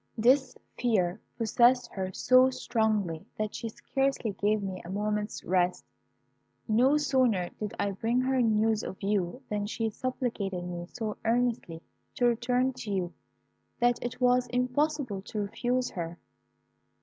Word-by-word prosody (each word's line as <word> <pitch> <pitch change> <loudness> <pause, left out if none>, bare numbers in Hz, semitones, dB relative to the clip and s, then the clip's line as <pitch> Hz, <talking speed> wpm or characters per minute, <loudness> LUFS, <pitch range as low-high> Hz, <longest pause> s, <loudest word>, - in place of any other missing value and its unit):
This 255 +3 +3 0.2
fear 205 -5 +1 0.2
possessed 240 +2 +3
her 190 -1 -3
so 255 +6 +5
strongly, 215 -10 0
that 215 -1 -2
she 230 - -4
scarcely 270 -1 -1
gave 205 +2 0
me 190 -2 -4
a 170 - -9
moment's 210 +1 -2
rest. 180 0 +1 0.8
No 250 +6 +4
sooner 255 -11 +2
did 210 -2 -4
I 200 - +1
bring 225 +5 0
her 260 0 +2
news 220 -1 +2
of 190 - -6
you 200 +4 -1
than 205 -1 -2
she 225 +1 -2
supplicated 210 -7 -3
me 175 -1 -5
so 220 -3 -4
earnestly 230 -8 0 0.3
to 245 - +2
return 245 +2 +2
to 225 - -6
you, 185 -3 -1 0.7
that 240 -1 +2
it 245 +1 -4
was 250 0 +3
impossible 250 -2 0
to 210 +2 -4
refuse 245 +5 -1
her. 170 -1 -5
225 Hz, 140 wpm, -29 LUFS, 200-250 Hz, 0.8 s, so